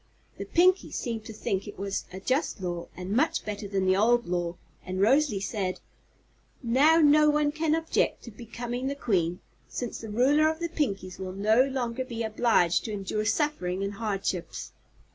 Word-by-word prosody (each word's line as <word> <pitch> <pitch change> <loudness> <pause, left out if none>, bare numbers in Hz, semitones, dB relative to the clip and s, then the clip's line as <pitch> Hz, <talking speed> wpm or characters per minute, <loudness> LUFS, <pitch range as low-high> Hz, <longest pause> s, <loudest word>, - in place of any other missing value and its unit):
The - - -4
Pinkies 365 +2 +3
seemed 230 -3 -3
to 220 - -8
think 195 -2 -2
it 205 - -9
was 195 +1 -3
a 185 - -7
just 255 +4 -1
law 175 -2 -4
and 180 +1 -6
much 265 +10 +1
better 205 -1 -4
than 195 -1 -1
the 185 0 +4
old 235 +4 +3
one, 175 -1 -1 0.3
and 185 0 -4
Rosalie 255 +1 +3
said: 190 -1 -3 0.8
"Now 275 +7 +5
no 300 0 +6
one 295 0 +2
can 310 0 +1
object 325 0 0
to 235 - -9
becoming 240 +3 -5
the 280 - -2
Queen, 180 -10 0 0.3
since 245 -2 -4
the 225 - -8
Ruler 280 +8 +4
of 320 - -2
the 340 +1 -3
Pinkies 195 - -2
will 185 -1 -5
no 215 +5 +3
longer 260 -2 -2
be 235 -3 -5
obliged 220 -6 +2
to 225 - -4
endure 205 +1 -2
suffering 205 - 0
and 200 +1 -3
hardships." 195 -5 -3
220 Hz, 180 wpm, -27 LUFS, 195-275 Hz, 0.8 s, no